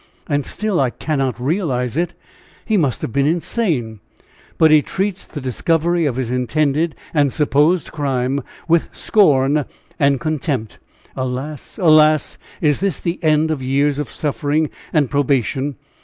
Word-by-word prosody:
And 145 Hz, -2 st, -1 dB
still 215 Hz, -4 st, -1 dB
I 135 Hz, -2 st, +2 dB
cannot 135 Hz, -2 st, -2 dB
realize 130 Hz, -, -1 dB
it! 175 Hz, +1 st, -1 dB, 0.5 s
He 220 Hz, -, +1 dB
must 145 Hz, -, +1 dB
have 115 Hz, -, -4 dB
been 140 Hz, 0 st, +2 dB
insane! 160 Hz, -, -1 dB, 0.6 s
But 160 Hz, -1 st, +5 dB
he 155 Hz, -1 st, +7 dB
treats 195 Hz, +4 st, -3 dB
the 150 Hz, -, -8 dB
discovery 165 Hz, +6 st, 0 dB
of 130 Hz, -, -2 dB
his 125 Hz, -2 st, -2 dB
intended 150 Hz, +5 st, 0 dB, 0.2 s
and 145 Hz, -4 st, +3 dB
supposed 150 Hz, +4 st, +2 dB
crime 135 Hz, -2 st, -1 dB, 0.3 s
with 170 Hz, 0 st, +2 dB
scorn 145 Hz, -8 st, +3 dB, 0.4 s
and 140 Hz, -2 st, +3 dB
contempt! 140 Hz, -6 st, -3 dB, 0.4 s
Alas! 130 Hz, +3 st, -5 dB
alas! 155 Hz, -3 st, +4 dB, 0.2 s
is 150 Hz, -3 st, +2 dB
this 195 Hz, -5 st, -1 dB
the 170 Hz, +1 st, -3 dB
end 155 Hz, 0 st, +3 dB
of 150 Hz, -4 st, -2 dB
years 140 Hz, +2 st, +1 dB
of 150 Hz, -, -4 dB
suffering 150 Hz, +1 st, -1 dB, 0.2 s
and 150 Hz, -3 st, +2 dB
probation? 140 Hz, 0 st, 0 dB
145 Hz, 140 wpm, -19 LUFS, 135-160 Hz, 0.6 s, he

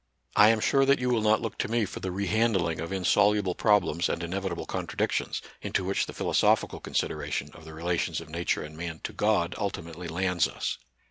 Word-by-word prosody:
I 105 Hz, -, +8 dB
am 110 Hz, -1 st, +3 dB
sure 135 Hz, +5 st, +3 dB
that 140 Hz, +1 st, +4 dB
you 125 Hz, 0 st, 0 dB
will 115 Hz, -2 st, +2 dB
not 110 Hz, +1 st, +3 dB
look 115 Hz, -, -5 dB
to -, -, 0 dB
me 115 Hz, -1 st, +1 dB
for -, -, -7 dB
the 95 Hz, -, -3 dB
rehandling 100 Hz, -2 st, +1 dB
of 85 Hz, -, -5 dB
insoluble 100 Hz, +1 st, +3 dB
problems 90 Hz, -6 st, +2 dB
and 85 Hz, -, -2 dB
inevitable 90 Hz, 0 st, -3 dB
contradictions, -, -, -2 dB, 0.2 s
into -, -, -1 dB
which 95 Hz, +2 st, 0 dB
the -, -, -7 dB
philosophical -, -, +2 dB
consideration -, -, -2 dB
of 80 Hz, -, -14 dB
the 80 Hz, -, -10 dB
relations 85 Hz, +1 st, -1 dB
of 80 Hz, -, -10 dB
Nature 85 Hz, +2 st, -1 dB
and 75 Hz, +1 st, -9 dB
man 80 Hz, 0 st, -6 dB
to -, -, -4 dB
God 105 Hz, -5 st, +1 dB
ultimately 85 Hz, -4 st, -4 dB
lands 90 Hz, 0 st, +1 dB
us. -, -, -4 dB
95 Hz, 195 wpm, -28 LUFS, 85-105 Hz, 0.2 s, I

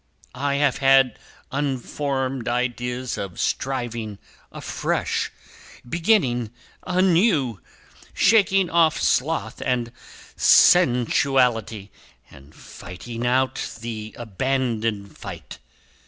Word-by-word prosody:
I 140 Hz, +2 st, -1 dB
have 140 Hz, -2 st, +1 dB
had 135 Hz, -1 st, +4 dB, 0.3 s
unformed 135 Hz, -2 st, -2 dB
ideas 125 Hz, +1 st, -2 dB
of 95 Hz, -3 st, -6 dB
striving 120 Hz, -5 st, -3 dB, 0.3 s
afresh, -, -, -2 dB, 0.6 s
beginning 135 Hz, -, +1 dB, 0.4 s
anew, 180 Hz, -, +2 dB, 0.5 s
shaking 195 Hz, -4 st, +3 dB
off 165 Hz, -2 st, +3 dB
sloth 160 Hz, +6 st, 0 dB
and 120 Hz, -2 st, -1 dB, 0.4 s
sensuality, 125 Hz, -, +3 dB, 0.4 s
and 70 Hz, +2 st, -16 dB
fighting 115 Hz, +7 st, -7 dB
out 130 Hz, -1 st, 0 dB
the 110 Hz, -2 st, -6 dB
abandoned 115 Hz, -3 st, -2 dB
fight. -, -, -9 dB
125 Hz, 80 wpm, -23 LUFS, 115-140 Hz, 0.6 s, had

